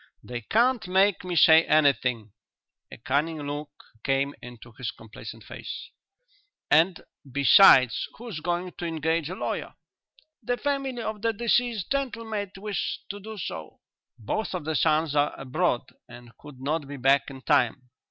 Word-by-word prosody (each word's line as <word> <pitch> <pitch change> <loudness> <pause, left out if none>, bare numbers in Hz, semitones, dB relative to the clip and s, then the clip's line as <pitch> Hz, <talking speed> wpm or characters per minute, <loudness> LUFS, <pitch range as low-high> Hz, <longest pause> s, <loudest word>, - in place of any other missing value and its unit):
"They 120 -1 -6
can't 235 - +2
make 190 +1 +3
me 180 -1 -4
say 160 +1 +7
anything." 130 -8 +2 0.6
A - - -9
cunning 150 +7 -1
look 145 +1 -5 0.3
came 135 +1 0
into 120 -1 -12
his 115 +1 -5
complacent 110 0 -10
face. - - -8 0.8
"And, 165 +4 +4 0.3
besides, 135 - +6
who's 230 -7 -7
going 175 +3 -2
to 175 - -3
engage 160 0 -1
a 185 - -5
lawyer?" - - -4 0.7
"The 245 +2 -1
family 275 -4 -2
of 215 -1 -4
the 230 0 +1
deceased 235 -2 0
gentleman 245 -5 -2
might 205 -2 -4
wish 205 +1 -3
to 205 - -5
do 220 +2 -9
so." 80 - -7 0.4
"Both 190 - -3
of 175 - -5
the 160 - -1
sons 155 +1 +2
are 145 0 +1
abroad 135 0 0 0.3
and 120 -1 -13
could 145 -3 -13
not 145 +2 -2
be 145 0 -7
back 135 +2 +3
in 135 -1 -11
time." 135 -4 +1
160 Hz, 150 wpm, -26 LUFS, 135-205 Hz, 0.8 s, say